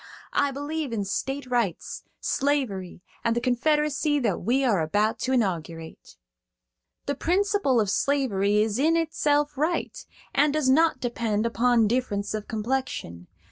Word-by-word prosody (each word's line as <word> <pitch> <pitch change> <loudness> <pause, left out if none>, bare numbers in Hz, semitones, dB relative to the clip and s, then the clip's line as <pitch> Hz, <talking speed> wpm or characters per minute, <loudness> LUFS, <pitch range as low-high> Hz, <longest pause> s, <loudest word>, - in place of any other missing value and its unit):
I 285 - +2
believe 290 +1 -4
in 210 -3 -2
state 270 +8 -3
rights, 240 -7 -2 0.2
slavery, 235 -12 -1 0.2
and 230 0 +1
the - - +2
Confederacy 295 +4 +1
that 215 -7 0
we 250 +8 +1
are 215 -9 +2
about 205 +8 0
to 260 - -2
inaugurate. 170 -9 -3 0.9
"The 285 - -1
principle 365 - +1
of 210 - +1
slavery 210 -8 +2
is 220 +1 -2
in 320 +4 +3
itself 295 -2 +1
right, 325 +4 -1 0.4
and 290 +1 +3
does 300 -4 +2
not 315 -1 +3
depend 230 -3 -1
upon 235 -1 +3
difference 215 -4 -1
of 215 -1 -4
complexion. 215 - -3
250 Hz, 140 wpm, -26 LUFS, 210-290 Hz, 0.9 s, in